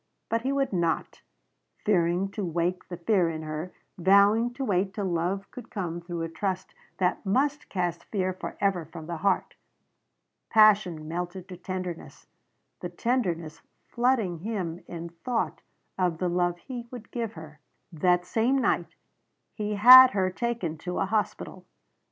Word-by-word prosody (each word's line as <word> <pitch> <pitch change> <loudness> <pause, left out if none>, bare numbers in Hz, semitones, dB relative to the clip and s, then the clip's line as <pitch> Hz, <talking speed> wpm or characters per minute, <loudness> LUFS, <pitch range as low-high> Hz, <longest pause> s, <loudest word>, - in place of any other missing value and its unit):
But 230 0 0
he 265 +3 -1
would 275 -4 0
not 170 -3 -1 0.6
fearing 180 -1 +2
to 205 - -4
wake 175 +1 -1
the 175 - -6
fear 180 -1 +2
in 160 -1 -5
her, 155 +3 -5 0.3
vowing 200 +6 +5
to 270 0 -3
wait 190 -1 0
till 205 - -2
love 180 +3 -2
could 240 -2 -10
come 175 -6 -4
through 170 -1 -5
a - - -2
trust 185 +3 -3 0.2
that 180 -1 0
must 275 +9 0
cast 175 -3 -2
fear 185 -3 -1
forever 185 -1 -2
from 160 0 -10
the 170 0 -4
heart. 200 +5 0 1.0
Passion 205 -8 +4
melted 175 +2 -5
to 185 - -7
tenderness; 180 -1 -6 0.5
the - - -5
tenderness 175 -11 -2 0.2
flooding 235 -8 0
him 180 -4 -4
in 170 0 -6
thought 225 +8 -3 0.4
of 180 -3 +1
the 180 +1 -1
love 175 0 0
he 240 +5 -8
would 240 -3 -10
give 230 -3 -3
her. 155 -2 -11 0.3
That 180 +2 +2
same 235 +7 +1
night 265 - 0 0.6
he 210 -1 -3
had 255 +5 +10
her 185 -2 +1
taken 205 -7 -3
to 180 +2 -4
a - - +1
hospital. 210 +2 -2
185 Hz, 150 wpm, -27 LUFS, 170-220 Hz, 1.0 s, had